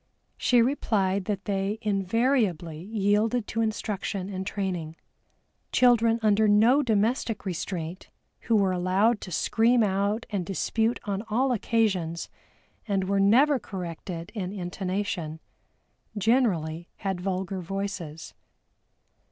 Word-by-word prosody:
She 245 -2 +4
replied 200 -7 0
that 200 -1 -3
they 200 +1 -1
invariably 195 - +1
yielded 210 +3 +1
to 225 - -1
instruction 205 -3 -2
and 190 -1 -4
training. 180 -6 -3 0.8
Children 235 -2 +4
under 215 0 +4
no 225 +7 +5
domestic 225 -1 0
restraint 175 -1 -4 0.3
who 230 - 0
were 195 -3 +3
allowed 190 +5 +2
to 185 - -8
scream 230 +7 +3
out 200 +3 0
and 200 -3 -1
dispute 220 +5 0
on 200 -1 -2
all 255 +5 +2
occasions 195 -8 0 0.6
and 195 -2 +1
were 195 +1 0
never 255 +8 +5
corrected 175 -2 -6
in 190 -5 -4
intonation, 185 -3 -3 0.8
generally 185 -8 +1
had 190 -3 -3
vulgar 190 0 -2
voices. 180 -4 -5
200 Hz, 110 wpm, -27 LUFS, 185-225 Hz, 0.8 s, no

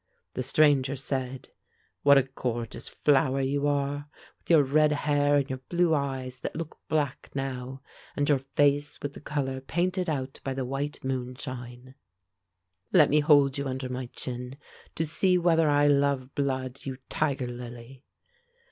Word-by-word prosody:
The - - -3
stranger 140 0 +3
said, 130 -1 -4 0.5
"What 140 0 +7
a 135 - +5
gorgeous 125 -3 -5
flower 135 -2 +2
you 140 +2 0
are, 145 0 -1 0.3
with - - -25
your 160 -4 +6
red 150 +3 +3
hair, 145 -1 +2
and 140 -2 +2
your 130 -1 -4
blue 175 -2 +3
eyes 130 -3 -2
that - - -5
look 160 -1 -6
black 145 -4 -1
now, 130 -1 -4 0.3
and 145 0 0
your 145 -3 +4
face 145 +2 +1
with 145 0 -3
the - - -11
color 135 -3 -3
painted 180 +5 -1
out 135 -3 -3
by 135 -1 -3
the 130 -1 -2
white 140 +3 -4
moonshine! 130 -1 -5 1.0
Let - - +6
me 150 - +5
hold 145 -2 +4
you 140 - -2
under 130 0 -4
my 125 0 -4
chin, 125 +2 -6 0.4
to 165 - 0
see 180 +4 +2
whether 165 -3 +3
I 145 0 +4
love 140 -2 +2
blood, 130 -2 -2
you 130 -2 -5
tiger 140 -4 0
lily!" 120 +1 -9
135 Hz, 155 wpm, -28 LUFS, 130-145 Hz, 1.0 s, What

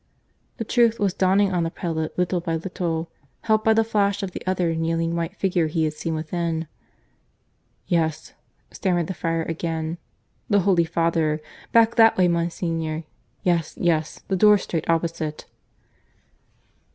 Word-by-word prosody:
The - - -2
truth 230 0 +2
was 200 -3 +1
dawning 195 +1 +2
on 175 - +1
the 165 - 0
prelate 160 -2 -4
little 180 0 +1
by 165 -1 -2
little, 165 -1 -3 0.3
helped 215 -1 +2
by 220 0 +4
the 225 - +4
flash 200 -2 0
of 190 - -3
the - - -7
other 180 -3 +1
kneeling 165 +1 -1
white 170 +3 -3
figure 180 -5 +1
he 160 +1 0
had 155 -1 0
seen 160 +1 -3
within. 165 0 -2 1.2
"Yes," 160 -2 -1 0.4
stammered 175 -4 0
the 190 - -4
friar 165 -1 -1
again. 165 0 -3 0.5
"The 205 -2 +4
Holy 175 -3 +3
Father. 165 -2 +1 0.3
Back 230 0 +4
that 225 -1 +6
way, 185 -1 +4
Monsignor. 165 -2 -1 0.4
Yes, 170 -3 0
yes 160 -3 0
that 190 - 0
door 210 +2 +6
straight 165 -5 -4
opposite." 165 -2 -1
170 Hz, 150 wpm, -23 LUFS, 165-190 Hz, 1.2 s, that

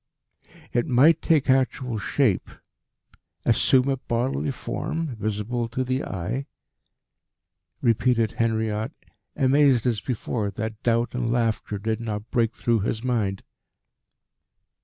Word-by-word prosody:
"It 120 0 +1
might 145 +6 +5
take 155 -4 +2
actual 130 -3 +1
shape 110 -3 +1 1.0
assume 130 0 +4
a 135 -1 +1
bodily 125 +2 -1
form 155 +1 -3
visible 110 +3 -2
to 125 +3 -2
the 130 +1 -1
eye?" 110 +9 -4 1.4
repeated 115 -1 +2
Henriot, 110 +2 -1 0.4
amazed 135 -2 +4
as 115 -4 +1
before 115 -3 -2
that 110 +2 -5
doubt 115 0 +1
and 125 -2 -1
laughter 115 -3 0
did 110 +3 -2
not 110 -1 -5
break 115 -1 +1
through 115 -2 +1
his 110 +2 -2
mind. 110 -6 -1
120 Hz, 115 wpm, -25 LUFS, 110-130 Hz, 1.4 s, might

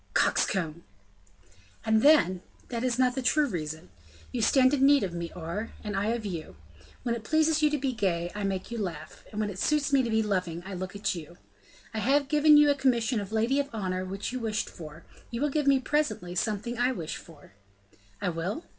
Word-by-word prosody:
"Coxcomb!" 170 -3 +1 1.0
"And 220 0 +3
then, 205 - +5 0.3
that 235 -1 -3
is 250 -2 0
not 255 -1 +3
the 265 - -2
true 300 +4 +3
reason. 160 - -5 0.4
You 245 - -2
stand 260 +4 +4
in 275 -2 +2
need 280 -2 +6
of 185 -3 -3
me, 170 -1 -4
Aure, 180 +6 -4
and 210 -2 -4
I 200 +2 0
of 230 -1 -1
you. 170 -6 -5 0.5
When 240 -2 0
it 230 -2 -5
pleases 315 +4 +2
you 305 - +5
to 300 - 0
be 270 -2 -1
gay, 175 -6 -1
I 210 - -4
make 195 +1 -3
you 235 - -3
laugh; 160 -6 -6
when 210 -1 -2
it 190 - -8
suits 295 +1 +1
me 275 - +6
to 240 - -2
be 220 0 +2
loving, 180 -5 -2
I 195 - -6
look 185 +1 -5
at 200 +1 -1
you. 170 0 -9 0.6
I 220 - -2
have 275 +5 +2
given 300 0 +6
you 295 0 +6
a - - +1
commission 245 -4 +1
of 200 0 -6
lady 230 +5 +1
of 285 0 -1
honor 185 -4 -2
which 195 +4 -4
you 255 - -3
wished 220 -2 -2
for; 160 -1 -10 0.3
you 235 - -4
will 295 +1 0
give 295 0 0
me, 275 -1 +5
presently, 250 -11 -1
something 220 +5 -2
I 250 +1 +3
wish 165 -9 -5
for." 150 -10 -15 0.7
"I - - -1
will?" 180 - -3
220 Hz, 215 wpm, -28 LUFS, 185-265 Hz, 1.0 s, need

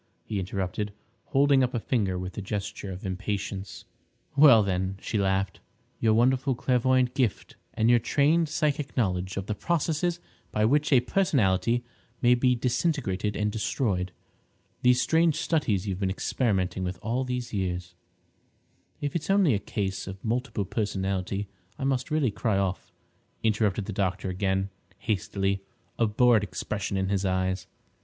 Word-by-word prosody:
he 105 - -2
interrupted, 95 +2 -3 0.3
holding 140 -1 +4
up 125 0 -1
a - - +1
finger 105 -6 0
with 90 0 -5
a - - -4
gesture 100 0 -4
of 95 +1 -7
impatience. 95 -1 -4 0.5
"Well, 140 -7 +8
then," 95 0 -1
she 110 - -2
laughed, 95 -1 0 0.4
"your 110 -1 +3
wonderful 130 +3 +3
clairvoyant 125 0 +2
gift 120 -7 -1 0.2
and 110 - +2
your 120 0 +6
trained 150 +7 +2
psychic 150 -3 -1
knowledge 95 -5 0
of 100 - -2
the 105 - -2
processes 170 - 0 0.3
by 105 0 +2
which 145 +6 +2
a 130 -3 +6
personality 120 - +2 0.4
may 120 0 +5
be 125 +1 +3
disintegrated 120 - 0
and 105 0 0
destroyed—these 110 +4 -2
strange 160 +2 +3
studies 110 - 0
you've 95 -1 -2
been 95 -2 0
experimenting 95 -2 0
with 90 0 -3
all 120 +3 0
these 125 -2 -4
years—" 90 -3 -2 1.1
"If 145 +2 -3
it's 170 - -2
only 195 -8 +4
a 100 - +1
case 95 -1 -3
of 95 +2 -8
multiple 115 -2 -1
personality 100 -1 -2 0.3
I 140 - -5
must 135 0 0
really 150 -6 +1
cry 105 -1 0
off," 95 -1 -2 0.5
interrupted 105 -2 +1
the 105 - -5
doctor 95 -1 -1
again 95 +1 -1 0.3
hastily, 100 -2 -1 0.4
a 115 - +4
bored 115 +1 +4
expression 100 0 -3
in 95 0 0
his 100 -1 0
eyes. 95 -1 0
105 Hz, 150 wpm, -27 LUFS, 95-125 Hz, 1.1 s, Well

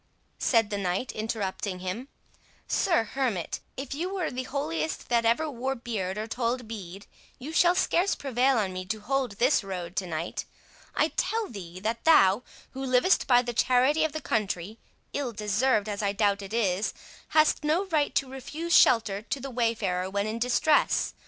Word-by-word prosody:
said 225 -4 +2
the 205 - -1
knight 190 +6 -1
interrupting 205 -3 -3
him,—"Sir 230 - -3
Hermit, 225 -6 -2 0.2
if 270 0 -5
you 345 +6 -3
were 375 -5 -2
the 255 0 -4
holiest 160 - -3
that 235 -1 +2
ever 235 +8 +2
wore 265 -1 -3
beard 210 -6 -3
or 215 - -2
told 240 +1 -2
bead, 195 -3 -8 0.3
you 295 +6 -7
shall 350 +1 +4
scarce 365 +1 +2
prevail 265 -1 +1
on 195 -4 0
me 185 0 -4
to 215 +4 -4
hold 260 +1 -1
this 245 +4 +2
road 180 -2 -6
to 190 - -1
night. 165 0 -4 0.5
I - - +3
tell 445 -1 -1
thee, 185 -4 -8
that 225 +3 -2
thou, 205 -10 +6 0.3
who 265 +1 -6
livest 255 +8 +3
by 245 -1 +5
the 240 -1 -4
charity 255 +6 +3
of 315 - +1
the 310 - -4
country—ill 220 +5 -4
deserved, 210 +1 +1
as 205 -1 -3
I 200 -1 0
doubt 205 -1 +1
it 195 0 -8
is—hast 230 - 0
no 320 +6 +1
right 310 -6 0
to 275 - +1
refuse 295 +6 -5
shelter 210 -4 +5
to 250 +5 -4
the 270 +1 -6
wayfarer 220 -7 0
when 200 +1 -1
in 220 +2 -3
distress. 250 +5 +2
230 Hz, 170 wpm, -27 LUFS, 200-270 Hz, 0.5 s, thou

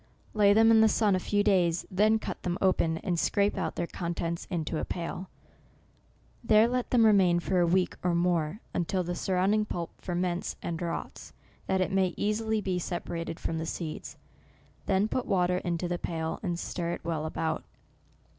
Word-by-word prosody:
Lay 205 -2 +5
them 225 +2 +6
in 220 -1 +6
the 220 - +6
sun 210 -2 +3
a - - 0
few 205 +2 +1
days, 180 -5 +2
then 215 +4 +4
cut - - -6
them 175 0 -2
open, 170 -4 +2
and 175 -2 0
scrape 200 +3 +1
out 180 -5 -2
their 175 - -1
contents 170 -1 -4
into 160 -2 -2
a - - -3
pail; 180 +1 -5 1.1
there 220 0 +5
let 250 0 -1
them 235 -3 +4
re 220 - +7
main 180 -3 +4
for 185 +1 0
a 175 - +3
week 180 +2 +2
or 175 -1 +1
more, 170 +2 0
until 180 +2 0
the 175 +1 -3
surround 185 +2 +1
ing 215 0 +2
pulp 170 -5 -4
ferments 180 0 -2
and 170 -1 -3
rots, 170 -1 -5 0.3
that 190 0 +1
it 185 - 0
may 190 -2 +1
easily 220 +1 0
be 185 -3 -1
Separated 170 -1 -4
from 160 - -2
the 160 - -3
seeds; 160 -2 -5 0.7
then 195 +2 +2
put 250 +3 -2
water 180 -1 +2
into 175 -1 -2
the 175 0 -2
pail, 160 -1 -3
and 175 -4 -2
stir 170 0 -3
it - - -6
well 160 -2 -2
about. 160 0 -2
180 Hz, 190 wpm, -29 LUFS, 170-205 Hz, 1.1 s, re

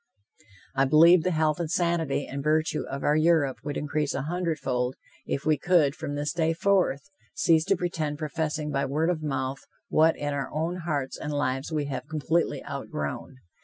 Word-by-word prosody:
I 135 0 +3
believe 165 +5 +7
the 185 - 0
health 155 -2 +1
and 170 -2 -2
sanity 170 -5 0
and 140 +1 -5
virtue 155 0 +1
of 140 - -5
our 145 - +3
Europe 155 -4 +3
would 145 0 -3
increase 150 0 -1
a 135 - -2
hundred 170 +1 -1
fold, 125 -2 -1 0.3
if 140 - -2
we 155 -3 +2
could, 165 -4 +3
from 145 -1 -5
this 145 +1 -2
day 165 -1 +1
forth, 180 -5 +1 0.3
cease 160 -1 +3
to 195 - +3
pretend 165 -4 -2
professing 155 0 -2
by 140 - 0
word 155 +5 +1
of 160 -3 -3
mouth 135 -2 -2 0.3
what 160 +1 +4
in 145 0 -2
our 140 -1 -3
own 165 +4 -2
hearts 140 -4 -2
and 150 - -4
lives 135 0 -1
we 150 -2 -1
have 140 -1 -5
completely 160 +2 -1
outgrown. 75 - -5
150 Hz, 185 wpm, -27 LUFS, 140-165 Hz, 0.3 s, believe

